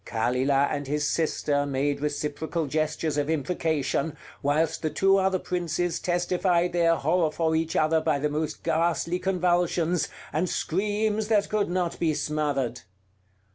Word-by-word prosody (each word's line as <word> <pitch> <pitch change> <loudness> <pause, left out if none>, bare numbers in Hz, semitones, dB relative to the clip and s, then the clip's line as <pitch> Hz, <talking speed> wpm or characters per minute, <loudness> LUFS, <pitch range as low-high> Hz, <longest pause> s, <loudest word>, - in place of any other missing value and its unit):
Kalilah 130 +5 +1
and 145 -2 -3
his 145 +1 0
sister 145 -3 0
made 140 +1 -1
reciprocal 150 +2 -2
gestures 155 +1 -1
of 145 +1 -1
imprecation, 155 -2 -1 0.2
whilst 150 +3 +1
the 155 - 0
two 195 +4 +3
other 190 0 +2
princes 175 -1 -2
testified 175 0 +1
their 165 -1 +3
horror 160 +2 +1
for 160 +1 0
each 165 0 -1
other 155 +1 +3
by 155 -3 +1
the 145 +2 0
most 150 +1 -3
ghastly 170 +2 0
convulsions, 175 -3 +1 0.2
and 165 +4 0
screams 210 +4 0
that 210 -2 +2
could 210 -3 0
not 175 -1 -1
be 160 -3 +1
smothered. 145 -5 -1
160 Hz, 140 wpm, -26 LUFS, 145-175 Hz, 0.2 s, two